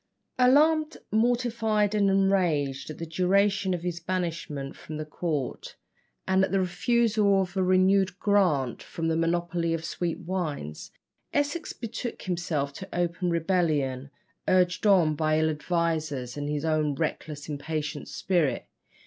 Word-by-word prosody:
Alarmed, 305 Hz, +5 st, +4 dB
mortified, 225 Hz, -2 st, +1 dB
and 205 Hz, -2 st, +3 dB
enraged 180 Hz, -9 st, +1 dB
at 155 Hz, -, -7 dB
the 165 Hz, -, -5 dB
duration 195 Hz, +4 st, +2 dB
of 170 Hz, -, -7 dB
his 175 Hz, -1 st, -3 dB
banishment 165 Hz, -6 st, -3 dB
from 155 Hz, 0 st, -7 dB
court, 150 Hz, -4 st, -4 dB, 0.5 s
and 190 Hz, 0 st, +3 dB
at -, -, 0 dB
the 195 Hz, -, +2 dB
refusal 205 Hz, +2 st, +2 dB
of 185 Hz, -1 st, -2 dB
a 190 Hz, -, +1 dB
renewed 185 Hz, 0 st, +3 dB
grant 175 Hz, -, +2 dB
for 165 Hz, -, -8 dB
the 165 Hz, 0 st, +1 dB
monopoly 170 Hz, 0 st, 0 dB
of 165 Hz, 0 st, -5 dB
sweet 170 Hz, 0 st, -2 dB
wines, 160 Hz, -, -4 dB, 0.4 s
Essex 290 Hz, +3 st, -1 dB
betook 235 Hz, +1 st, -6 dB
himself 160 Hz, -6 st, -2 dB
to 190 Hz, +6 st, -9 dB
open 175 Hz, +1 st, -1 dB
rebellion, 155 Hz, -6 st, 0 dB, 0.4 s
urged 180 Hz, +2 st, +3 dB
on 175 Hz, -6 st, +5 dB
by 155 Hz, +1 st, +1 dB
ill 160 Hz, 0 st, +2 dB
advisers 155 Hz, -5 st, -2 dB
and 145 Hz, 0 st, -3 dB
his 150 Hz, +1 st, -2 dB
own 155 Hz, -2 st, +1 dB
reckless 150 Hz, -1 st, -4 dB
impatient 150 Hz, 0 st, -4 dB
spirit. 175 Hz, -7 st, 0 dB
175 Hz, 135 wpm, -27 LUFS, 155-195 Hz, 0.5 s, on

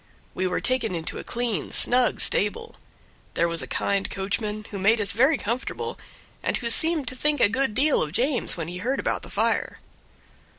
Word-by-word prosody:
We 185 Hz, +1 st, -1 dB
were 180 Hz, -, -1 dB
taken 255 Hz, -8 st, 0 dB
into 165 Hz, -1 st, -4 dB
a -, -, -7 dB
clean, 230 Hz, -9 st, -3 dB
snug 245 Hz, -1 st, +2 dB
stable; 330 Hz, -, 0 dB, 0.6 s
there 170 Hz, -, +2 dB
was 170 Hz, -1 st, -3 dB
a -, -, -7 dB
kind 200 Hz, -1 st, 0 dB
coachman, 210 Hz, +2 st, -3 dB
who 200 Hz, -, -5 dB
made 220 Hz, +4 st, +3 dB
us 200 Hz, -1 st, +1 dB
very 265 Hz, +7 st, +3 dB
comfortable, 260 Hz, -, -4 dB, 0.4 s
and -, -, 0 dB
who 235 Hz, -1 st, -1 dB
seemed 315 Hz, +2 st, +4 dB
to 255 Hz, -, -7 dB
think 295 Hz, +3 st, 0 dB
a -, -, +6 dB
good 260 Hz, 0 st, -1 dB
deal 285 Hz, +3 st, +3 dB
of 150 Hz, -, -2 dB
James 255 Hz, -, +2 dB
when 165 Hz, -2 st, -4 dB
he 175 Hz, +1 st, -6 dB
heard 255 Hz, +7 st, -1 dB
about -, -, -1 dB
the -, -, -10 dB
fire. -, -, -1 dB
230 Hz, 195 wpm, -25 LUFS, 195-265 Hz, 0.6 s, a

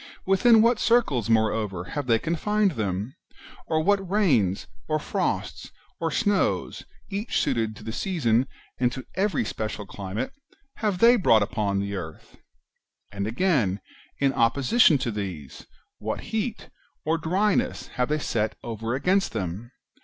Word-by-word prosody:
within 220 Hz, +4 st, +5 dB
what 230 Hz, -1 st, +3 dB
circles, 150 Hz, -, +2 dB
moreover, 110 Hz, -4 st, +1 dB
have 140 Hz, +9 st, -5 dB
they 115 Hz, -2 st, +4 dB
confined 200 Hz, -, +1 dB
them? 105 Hz, -, -3 dB, 0.5 s
or, 155 Hz, 0 st, +1 dB
what 195 Hz, 0 st, +1 dB
rains, 135 Hz, -, +2 dB, 0.2 s
or 155 Hz, -, +1 dB
frosts, 150 Hz, -, -3 dB, 0.3 s
or 165 Hz, -, 0 dB
snows, 205 Hz, +2 st, 0 dB, 0.3 s
each 205 Hz, +4 st, -1 dB
suited 115 Hz, -6 st, 0 dB
to -, -, -12 dB
the 110 Hz, -, -5 dB
season, 130 Hz, -, +1 dB, 0.3 s
and 125 Hz, -1 st, +2 dB
to 130 Hz, 0 st, -7 dB
every 190 Hz, -, 0 dB
special 110 Hz, -1 st, -4 dB
climate, 100 Hz, -, -5 dB, 0.4 s
have 210 Hz, -4 st, 0 dB
they 235 Hz, +5 st, +7 dB
brought 115 Hz, -, +4 dB
upon 100 Hz, -1 st, -1 dB
the 100 Hz, 0 st, -2 dB
earth? 80 Hz, -4 st, -8 dB, 0.7 s
And 100 Hz, 0 st, -3 dB
again, 115 Hz, -, +1 dB, 0.4 s
in 140 Hz, -1 st, +2 dB
opposition 140 Hz, -, +4 dB
to 125 Hz, -3 st, -2 dB
these, 90 Hz, -10 st, -6 dB, 0.3 s
what -, -, -3 dB
heat 220 Hz, +1 st, -3 dB, 0.3 s
or 160 Hz, +2 st, +1 dB
dryness 190 Hz, +6 st, 0 dB
have 125 Hz, 0 st, -1 dB
they 150 Hz, -, +1 dB
set 110 Hz, -7 st, -1 dB
over 115 Hz, +1 st, -3 dB
against 190 Hz, +8 st, +1 dB
them 100 Hz, +2 st, -4 dB
130 Hz, 140 wpm, -25 LUFS, -, 0.7 s, they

